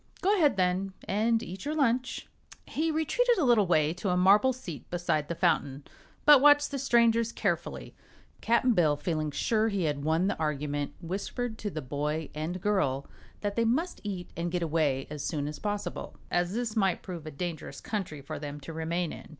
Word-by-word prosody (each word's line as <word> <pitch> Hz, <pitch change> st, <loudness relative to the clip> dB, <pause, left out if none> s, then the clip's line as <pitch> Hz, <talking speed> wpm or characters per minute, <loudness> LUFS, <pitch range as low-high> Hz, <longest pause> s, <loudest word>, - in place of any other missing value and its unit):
"Go 395 Hz, +3 st, +4 dB
ahead, 295 Hz, -, +3 dB
then, 185 Hz, +1 st, +1 dB
and 225 Hz, +3 st, +1 dB
eat 185 Hz, +2 st, -7 dB
your 300 Hz, +2 st, -2 dB
lunch." 255 Hz, -3 st, 0 dB, 0.4 s
He 320 Hz, +3 st, -1 dB
retreated 465 Hz, +11 st, +2 dB
a 345 Hz, -, +2 dB
little 230 Hz, -6 st, +4 dB
way 155 Hz, -2 st, +3 dB
to 185 Hz, +3 st, -3 dB
a 180 Hz, -, +2 dB
marble 200 Hz, +8 st, +5 dB
seat 175 Hz, -, -8 dB
beside 170 Hz, -4 st, -1 dB
the 170 Hz, -, -3 dB
fountain, 145 Hz, -5 st, +1 dB, 0.4 s
but 295 Hz, -3 st, +8 dB
watched 290 Hz, 0 st, +6 dB
the 275 Hz, -, -3 dB
strangers 235 Hz, -3 st, +3 dB
carefully. -, -, -3 dB, 0.5 s
Cap'n 235 Hz, +2 st, +3 dB
Bill, 155 Hz, -7 st, +3 dB
feeling 155 Hz, 0 st, -1 dB
sure 220 Hz, +9 st, +1 dB
he 200 Hz, -4 st, -1 dB
had 145 Hz, -3 st, -1 dB
won 160 Hz, +4 st, +2 dB
the 200 Hz, -, +1 dB
argument, 145 Hz, -2 st, -2 dB
whispered 220 Hz, +6 st, -4 dB
to 210 Hz, -, -3 dB
the 155 Hz, -6 st, -5 dB
boy 150 Hz, +4 st, -3 dB
and 160 Hz, +4 st, -3 dB
girl 140 Hz, -10 st, +1 dB, 0.4 s
that 205 Hz, -1 st, -2 dB
they 230 Hz, -, +2 dB
must 290 Hz, +11 st, 0 dB
eat 190 Hz, -4 st, -5 dB
and 170 Hz, 0 st, -2 dB
get 175 Hz, -1 st, -1 dB
away 150 Hz, -5 st, +1 dB
as 150 Hz, -2 st, -5 dB
soon 145 Hz, -3 st, -2 dB
as 150 Hz, 0 st, -6 dB
possible, 205 Hz, -1 st, -4 dB
as 175 Hz, +2 st, 0 dB
this 235 Hz, -2 st, -2 dB
might 195 Hz, -4 st, +1 dB
prove 170 Hz, -5 st, -7 dB
a -, -, -3 dB
dangerous 160 Hz, +2 st, -5 dB
country 185 Hz, -9 st, -4 dB
for 155 Hz, +1 st, -6 dB
them 145 Hz, 0 st, -6 dB
to 165 Hz, +4 st, -8 dB
remain 165 Hz, +1 st, -2 dB
in. -, -, -11 dB
180 Hz, 190 wpm, -29 LUFS, 155-230 Hz, 0.5 s, but